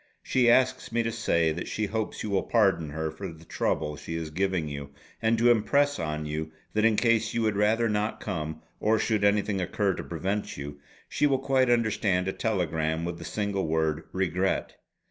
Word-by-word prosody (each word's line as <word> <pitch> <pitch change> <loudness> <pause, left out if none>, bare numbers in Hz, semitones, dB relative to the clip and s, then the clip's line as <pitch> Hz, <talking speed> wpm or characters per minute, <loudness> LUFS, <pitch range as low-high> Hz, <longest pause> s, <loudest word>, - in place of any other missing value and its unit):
She 125 -2 +3
asks 130 0 +3
me 115 0 +1
to 115 - -1
say 85 -8 +1
that 85 +3 -4
she 110 - -1
hopes 110 +1 -3
you 105 - -3
will 95 - +2
pardon 95 -9 +2
her 80 +1 -3
for 95 +3 -7
the 80 0 -14
trouble 75 -1 -1
she 80 - -6
is 80 -2 -4
giving 90 -1 0
you, 70 -1 -6 0.3
and 115 0 +2
to 120 +2 +5
impress 140 +6 +2
on 75 -1 -3
you 80 +1 -4 0.2
that 110 - +1
in 115 -1 +4
case 115 -1 +2
you 115 - +1
would 110 -2 +1
rather 110 +3 +3
not 105 0 -1
come, 80 -5 -4 0.2
or 110 +1 +3
should 110 -1 0
anything 100 -1 +2
occur 95 +2 0
to - - -5
prevent 95 +5 -3
you, 70 +1 -7 0.3
she 145 - +2
will 135 -2 +2
quite 130 -1 +2
understand 110 -6 +2
a 95 - -1
telegram 80 -6 -1
with 85 -1 -4
the 85 - -8
single 100 0 -2
word 80 0 0
'regret.' 95 0 -1
95 Hz, 200 wpm, -27 LUFS, 80-110 Hz, 0.3 s, to